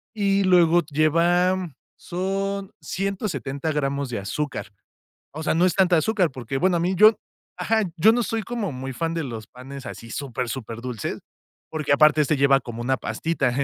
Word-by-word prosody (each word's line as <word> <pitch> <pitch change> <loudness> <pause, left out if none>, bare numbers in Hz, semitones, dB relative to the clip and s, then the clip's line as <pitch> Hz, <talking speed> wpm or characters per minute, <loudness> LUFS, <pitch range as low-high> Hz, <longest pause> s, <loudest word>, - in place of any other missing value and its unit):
y 200 -1 +2
luego 175 -2 +5
lleva, 170 +5 +3
mm, 180 -5 -6 0.2
son 195 +2 -3
170 180 -7 -3
gramos 140 -2 -1
de 120 - -3
azúcar. 110 +1 -4 0.6
O 155 - -6
sea, - - +1
no 170 +2 +3
es 180 -2 +2
tanta 185 -2 +4
azúcar 180 +1 +2
porque, 130 0 -4
bueno, 180 +3 +2
a - - 0
mí 180 +3 0
yo 215 +3 +7 0.4
ajá, 225 0 +1
yo 215 +6 +6
no 240 +1 +1
soy 225 -1 -2
como 230 -4 -3
muy 130 0 -6
fan 165 +5 -2
de 165 -2 -2
los 115 -4 -7
panes 135 +2 -10
así 115 - -9
súper, 125 -3 -4
superdulces, 115 -2 -5 0.5
porque, 155 -2 0
aparte 155 +1 +5
este 150 0 +2
lleva 135 0 +4
como 120 -2 -7
una 130 +2 +1
pastita. 160 0 -1
160 Hz, 175 wpm, -24 LUFS, 135-185 Hz, 0.6 s, yo